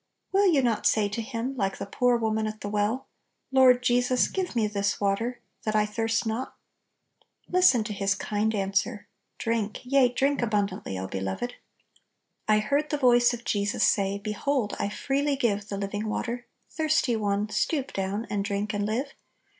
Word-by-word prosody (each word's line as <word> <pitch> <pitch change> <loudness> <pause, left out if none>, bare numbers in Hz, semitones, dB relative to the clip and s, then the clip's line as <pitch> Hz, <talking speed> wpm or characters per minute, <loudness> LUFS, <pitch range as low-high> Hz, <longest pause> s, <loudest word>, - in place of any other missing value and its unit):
Will 395 +1 +4
you 280 -5 +3
not 230 -3 +2
say 210 -2 +3
to 210 +3 -3
Him, 235 +3 -4
like 195 -5 -1
the - - -5
poor 245 +4 +2
woman 220 -1 0
at 215 0 -6
the 205 - -4
well, 210 +5 0 0.2
" - - -51
Lord 255 -2 +6
Jesus, 245 0 +3
give 370 -7 -3
me 225 -2 +2
this 205 -1 -1
water, 215 +5 -1 0.2
that 215 -1 -2
I 210 0 +4
thirst 225 +2 -1
not! 225 +4 -3 0.6
n - - -34 0.3
Listen 360 -11 +5
to 210 - -4
his 195 -1 0
kind 215 +2 -1
answer! 200 +2 -1 0.3
"Drink, 225 -2 -2
yea, 255 0 +4
drink 275 +3 +1
abundantly, 200 - -1
O 95 - -3
beloved! 95 - -3 0.5
" - - -51
"I 215 0 +5
heard 280 +8 0
the 295 - 0
voice 240 -3 +5
of 235 0 -13
Jesus 205 0 0
say, 200 -1 +2
Behold, 215 +3 -1
I 200 - 0
freely 280 +6 0
give 210 -6 -1
The 200 - -3
living 205 +2 -3
water; 240 +2 -3 0.2
thirsty 310 -6 +1
one, 205 -1 0
Stoop 275 +5 -1
down, 195 +3 -2
and 205 -1 -1
drink, 205 +1 -2
and 205 0 -1
live. 255 +6 -2
220 Hz, 180 wpm, -27 LUFS, 205-250 Hz, 0.6 s, Lord